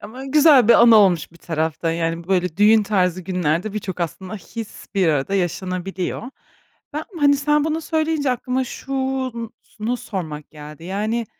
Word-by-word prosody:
Ama, 250 +6 -9
güzel 280 -4 +6
bir - - +8
anı 230 -2 +8
olmuş 180 -7 +3
bir 170 - -17
taraftan, 160 0 -2
yani, 165 +1 -2
böyle, 180 -3 0
düğün 215 +2 +5
tarzı 185 -3 0
günlerde 180 +2 -1
birçok 190 -4 -5
aslında 185 +4 -4
his 220 +3 -9
bir 190 -4 +3
arada 150 +6 0
yaşanabiliyor. 185 +5 -3 0.6
Ben, 305 +2 -4 0.2
hani, 285 0 +5
sen 295 +1 +1
bunu 320 +1 -1
söyleyince 315 -3 0
aklıma 250 +1 -1
şunu 260 -3 -3
sunu 225 +3 -4
sormak 160 -10 -6
geldi, 150 +1 -11
yani, 215 +5 -2
205 Hz, 155 wpm, -21 LUFS, 175-255 Hz, 0.6 s, bir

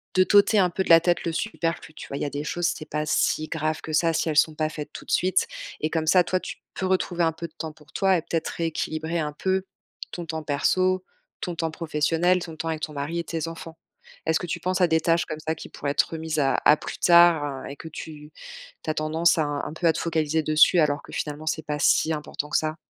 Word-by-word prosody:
de 185 - +6
t'ôter 205 +3 +5
un 185 -3 +4
peu 190 - -1
de - - -8
la 165 -1 +9
tête 175 +1 +1
le 165 - -1
superflu, 165 -3 -3
tu - - -10
vois? 140 - -5
Il - - -6
y - - 0
a - - -2
des 145 +1 -4
choses, 175 +3 -1
c'est 155 - -10
pas 150 +1 -2
si 155 0 +1
grave 155 -1 -2
que 155 - -6
ça 165 +2 +3
si 160 - 0
elles 155 - -1
sont 155 -1 +4
pas 155 0 0
faites 150 -1 -7
tout - - -10
de - - -7
suite. 185 +1 +2 0.4
Et 155 - -1
comme 160 -1 -1
ça, 180 +2 +6
toi 185 - 0
tu - - -7 0.2
peux 190 - -2
retrouver 180 -2 0
un 165 - +3
peu 170 +1 -7
de 155 - -29
temps 160 -1 -6
pour 150 -1 -21
toi 190 -2 +3
et - - -2
peut-être 165 -1 -2
rééquilibrer 165 0 -2
un 150 -2 -2
peu 190 +4 0 0.5
ton 175 - -6
temps 160 -1 -4
perso, 185 +6 +1 0.4
ton 175 - -3
temps 165 -1 -1
professionnel, 165 +3 +1
ton 165 -2 -8
temps 165 +1 -4
avec 160 -1 -3
ton 155 - -4
mari 145 +4 -3
et 170 - -2
tes 165 0 -3
enfants. 165 0 -8 0.5
Est-ce 160 0 +2
que 175 - -5
tu - - -3
penses 185 +1 -1
à 180 - +6
des 160 -1 +3
tâches 170 +1 +2
comme 155 -1 -6
ça 160 - 0
qui - - -10
pourraient 145 - -3
être 145 - +1
remises 160 -1 -2
à 135 -2 +2
à 150 - +8
plus - - -7
tard 165 -6 +4
et 140 - -7
que 160 - -10
tu 150 -1 -9 0.5
tu - - -2
as - - 0
tendance 160 +2 +2
à 155 - +2
un 145 0 -3
peu 165 +2 -2
à 165 - +6
te - - -3
focaliser 160 -1 0
dessus 155 +3 +5
alors 145 -2 +1
que - - -14
finalement, 150 +1 -4
c'est 155 0 -1
pas 150 0 -2
si 160 +2 +3
important 150 -1 -5
que - - +3
ça? 155 0 -2
160 Hz, 265 wpm, -25 LUFS, 155-170 Hz, 0.5 s, la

